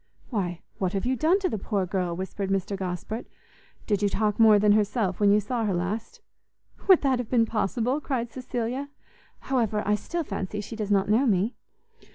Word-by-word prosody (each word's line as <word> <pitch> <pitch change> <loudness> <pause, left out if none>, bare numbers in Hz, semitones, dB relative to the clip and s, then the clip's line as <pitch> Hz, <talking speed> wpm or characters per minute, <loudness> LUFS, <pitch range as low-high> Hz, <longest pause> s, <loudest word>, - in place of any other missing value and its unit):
"Why, 180 -6 -2 0.2
what 185 0 0
have 195 +2 -1
you 260 +1 +1
done 320 +9 +3
to 380 - +1
the 220 - -3
poor 195 -1 -1
girl?" 180 -2 -2
whispered 190 +2 -4
Mr 195 +1 -1
Gosport; 190 +4 -4 0.6
"did 205 -2 0
you 205 - +3
talk 210 +1 0
more 220 -2 +7
than 205 0 +4
herself 205 -2 +1
when 205 -1 +4
you 210 - +5
saw 230 +3 -2
her 200 -4 0
last?" 215 - -3 0.7
"Would 375 -3 +7
that 265 -3 +2
have 245 - -4
been 235 -3 +3
possible?" 230 - -1
cried 240 -5 -2
Cecilia; 255 +2 -3 0.5
"however, 225 -5 0
I 210 - +2
still 335 +11 -2
fancy 200 -4 -4
she 210 +2 -6
does 215 -2 -3
not 195 -2 +3
know 230 +6 +3
me." 205 +3 +2
210 Hz, 195 wpm, -26 LUFS, 195-245 Hz, 0.7 s, more